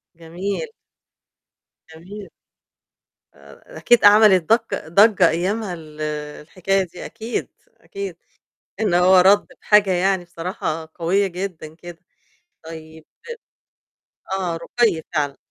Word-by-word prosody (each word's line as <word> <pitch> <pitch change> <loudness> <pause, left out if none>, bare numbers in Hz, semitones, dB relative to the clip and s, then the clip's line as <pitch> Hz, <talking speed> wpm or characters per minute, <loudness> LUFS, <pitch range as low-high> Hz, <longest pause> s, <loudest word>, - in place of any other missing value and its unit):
جميل. 175 - -5 1.3
جميل. 195 +5 -11 1.0
آآ، - - -16
أكيد 240 -1 +3
أعمل 205 -2 +7
دق 225 +4 -1
ضجّة 195 +1 +4
أيامها 190 +4 -2
ال 155 -2 -11 0.4
الحكاية 190 +5 -1
دي، 180 -1 -10
أكيد، 225 +1 -5 0.3
أكيد، 395 -1 -8 0.6
إنه 195 -5 +2
هو 185 +1 +5
رَد 195 +3 +4
بحاجة 210 -2 +3
يعني 185 0 +1
بصراحة 165 -2 -5
قوية 185 +4 0
جدًا 180 -4 -7
كده. 175 0 -12 0.7
طيب 160 -1 -11 1.3
آه، 175 -3 -3
رُقَي 215 -3 0
فعلًا. 145 -3 -1
185 Hz, 100 wpm, -21 LUFS, 165-205 Hz, 1.3 s, أعمل